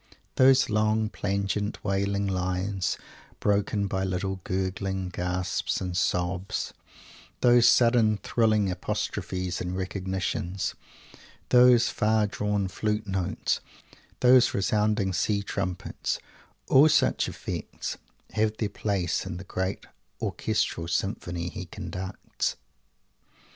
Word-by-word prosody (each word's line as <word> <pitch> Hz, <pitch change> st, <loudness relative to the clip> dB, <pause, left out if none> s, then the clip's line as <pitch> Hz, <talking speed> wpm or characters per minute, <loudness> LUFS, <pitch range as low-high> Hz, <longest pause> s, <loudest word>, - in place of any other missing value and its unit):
Those 130 Hz, 0 st, +5 dB
long, 110 Hz, 0 st, +1 dB
plangent, 100 Hz, 0 st, -2 dB
wailing 100 Hz, 0 st, 0 dB
lines, 95 Hz, 0 st, -1 dB, 0.4 s
broken 100 Hz, 0 st, +1 dB
by 95 Hz, -1 st, -1 dB
little 95 Hz, +1 st, -2 dB
gurgling 95 Hz, 0 st, -2 dB
gasps 90 Hz, 0 st, -1 dB
and 90 Hz, -2 st, -4 dB
sobs; 90 Hz, +1 st, -1 dB, 0.7 s
those 120 Hz, -1 st, +6 dB
sudden 115 Hz, -3 st, +4 dB
thrilling 105 Hz, -1 st, +2 dB
apostrophes 90 Hz, 0 st, -3 dB
and 90 Hz, +1 st, -3 dB
recognitions; 95 Hz, -1 st, -2 dB, 0.8 s
those 125 Hz, -1 st, +6 dB
far 110 Hz, 0 st, +2 dB
drawn 105 Hz, -1 st, -1 dB
flute 105 Hz, +3 st, -2 dB
notes; 95 Hz, -3 st, -1 dB, 0.6 s
those 125 Hz, 0 st, +6 dB
resounding 105 Hz, -1 st, +1 dB
sea 100 Hz, +3 st, +1 dB
trumpets; 95 Hz, -2 st, -3 dB, 0.5 s
all 145 Hz, +4 st, +7 dB
such 155 Hz, -, +2 dB
effects -, -, -5 dB, 0.3 s
have 110 Hz, 0 st, 0 dB
their 105 Hz, -, -1 dB
place 100 Hz, -4 st, -1 dB
in -, -, -5 dB
the 90 Hz, -, -7 dB
great 95 Hz, 0 st, -3 dB, 0.3 s
orchestral 85 Hz, -, -1 dB
symphony 85 Hz, -1 st, -2 dB
he 95 Hz, +1 st, -6 dB
conducts! 95 Hz, +3 st, -4 dB
100 Hz, 100 wpm, -27 LUFS, 95-105 Hz, 0.8 s, all